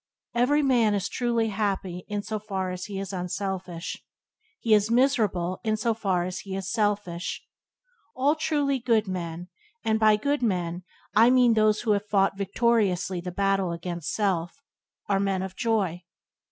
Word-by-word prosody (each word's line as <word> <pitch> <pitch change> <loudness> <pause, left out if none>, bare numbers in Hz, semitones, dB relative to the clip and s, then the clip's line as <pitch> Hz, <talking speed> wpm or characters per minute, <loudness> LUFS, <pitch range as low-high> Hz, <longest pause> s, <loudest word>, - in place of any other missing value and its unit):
Every 280 +5 +3
man 235 -6 +3
is 200 -1 -1
truly 235 -2 0
happy 195 -4 -2
in 205 -1 -3
so 215 0 -3
far 190 -3 -3
as 180 0 -5
he 200 -2 -6
is 195 0 -5
unselfish; 180 -1 -4 0.6
he 225 - +2
is 210 0 +4
miserable 220 -8 +1
in 215 -1 +1
so 230 +1 +1
far 195 -5 0
as 180 +1 -4
he 195 -1 -6
is 190 0 -4
selfish. 205 -6 -1 0.7
All 275 +3 +3
truly 290 -3 0
good 230 -3 +2
men, 175 -1 -5 0.4
and 220 0 +2
by 215 -1 +6
good 285 +7 0
men 180 -6 -1 0.3
I 225 +3 +7
mean 250 -2 +5
those 215 -1 +3
who 225 - +1
have 205 0 0
fought 195 -1 +2
victoriously 195 -3 +1
the 180 +1 -5
battle 195 -1 +1
against 170 -1 -4
self, 195 +4 -1 0.4
are 195 -1 +2
men 195 -1 0
of 190 -1 -6
joy. 200 -7 0
205 Hz, 165 wpm, -26 LUFS, 185-225 Hz, 0.7 s, I